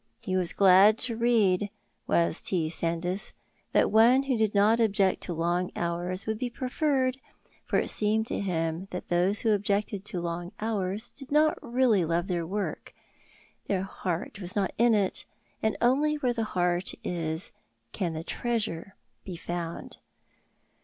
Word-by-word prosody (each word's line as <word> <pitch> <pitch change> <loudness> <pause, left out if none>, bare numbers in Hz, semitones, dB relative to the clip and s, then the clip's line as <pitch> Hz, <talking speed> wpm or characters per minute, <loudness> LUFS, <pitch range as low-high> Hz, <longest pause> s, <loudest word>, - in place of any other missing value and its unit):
He 185 - -3
was 180 -2 +1
glad 195 +2 +6
to 235 -2 -3
read, 210 -4 +2 0.4
was 170 -1 +1
T. 165 -4 0
Sandys, 170 +3 0 0.4
that - - +3
one 235 +5 +6
who 270 -2 0
did 220 -2 0
not 210 +3 +4
object 200 -4 +2
to 175 - -4
long 175 +2 0
hours 175 +2 -2
would 220 -1 -2
be 250 -1 -2
preferred, 260 +1 0 0.5
for - - 0
it - - +1
seemed 215 +1 +1
to - - -3
him 165 -1 -2
that 180 - -7
those 180 +4 +1
who 225 - +2
objected 205 -1 0
to 180 - -4
long 175 +1 -4
hours 210 0 -2
did 275 0 -12
not 305 +1 +4
really 235 -6 +2
love 170 +1 0
their 175 -4 -2
work, 205 +3 -4 0.7
their 190 -2 0
heart 190 +1 -4
was 180 +1 -3
not 200 -2 0
in 235 -1 +5
it, 200 -3 -1 0.4
and 220 -1 0
only 285 +5 +3
where 255 -5 0
the 225 -2 -2
heart 180 -2 0
is 165 0 -2 0.4
can 175 -4 -2
the 160 0 -5
treasure 215 -5 -3 0.3
be 185 - -7
found. 170 0 -5
195 Hz, 160 wpm, -28 LUFS, 175-225 Hz, 0.7 s, glad